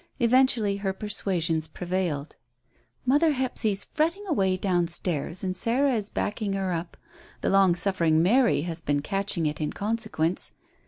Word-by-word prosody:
Eventually 235 -4 +3
her 195 -1 -2
persuasions 180 -6 -1
prevailed. 175 -3 -3 0.7
"Mother 295 +5 +3
Hephzy's 245 -6 -1
fretting 335 +7 0
away 195 - +1
down 180 -3 +1
stairs 170 0 0
and 185 -1 -2
Sarah 255 +8 +1
is 215 -3 -2
backing 210 -1 -2
her 190 -2 -1
up. 170 0 -5 0.4
The - - 0
long 195 -3 +5
suffering 170 -4 +2
Mary 225 - +3
has 165 0 -4
been 145 -2 -1
catching 195 -2 -1
it 150 +1 -2
in 150 - -2
consequence. 205 -6 -2
195 Hz, 145 wpm, -26 LUFS, 170-225 Hz, 0.7 s, long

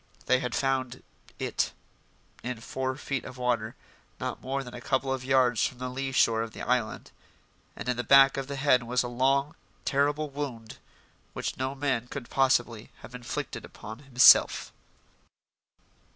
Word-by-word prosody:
They 130 0 +3
had 125 -2 -3
found 130 -2 -1 0.3
"it" - - -1 0.7
in 125 -1 -5
four 130 +3 -3
feet 135 -1 -3
of 130 - -10
water 120 -3 -1 0.4
not - - -4
more 135 +1 -3
than 125 -2 -10
a 125 - -8
couple 135 +1 0
of 130 -1 -4
yards 130 -3 +3
from 125 - -11
the 125 +1 -4
lee 135 +1 -3
shore 115 -3 +3
of 115 -1 -5
the - - -7
island. 125 -3 -1 0.6
And - - -7
in 125 -1 0
the 120 - -1
back 135 0 +7
of 135 -1 -4
the 140 - -5
head 135 -2 +3
was 125 +1 0
a - - -3
long, 135 +4 +1 0.3
terrible 145 +2 +1
wound 130 -6 -6 0.5
which - - -3
no 130 +1 -3
man 135 -4 -1
could 130 -2 -8
possibly 120 -4 +1
have - - -12
inflicted 125 -1 -5
upon 110 +3 -10
himself. 135 -3 +5
130 Hz, 165 wpm, -28 LUFS, 120-135 Hz, 0.7 s, back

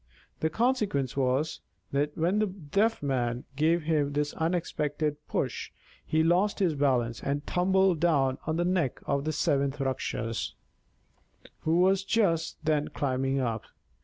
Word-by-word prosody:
The 160 - +1
consequence 210 - 0
was, 135 +3 0 0.3
that 145 +2 0
when 175 +6 +2
the 215 - +2
Deaf 195 +3 0
Man 125 -3 -1
gave 160 +3 +2
him 150 -3 +1
this 145 0 0
unexpected 155 -3 -1
push, - - -2 0.3
he 160 0 +1
lost 180 +5 +2
his 180 -5 +2
balance 125 -5 +1
and 145 +1 -2
tumbled 190 -1 +2
down 140 -6 +2
on 160 +1 0
to 175 - +2
the - - 0
neck 170 -9 0
of 140 0 0
the 155 - 0
seventh 140 -1 0
Rakshas, 115 -4 -2 1.0
who 165 +3 +2
was 190 +1 +3
just 190 -7 +1
then 150 -1 +2
climbing 135 0 -1
up. 115 -4 -2
150 Hz, 145 wpm, -28 LUFS, 140-175 Hz, 1.0 s, was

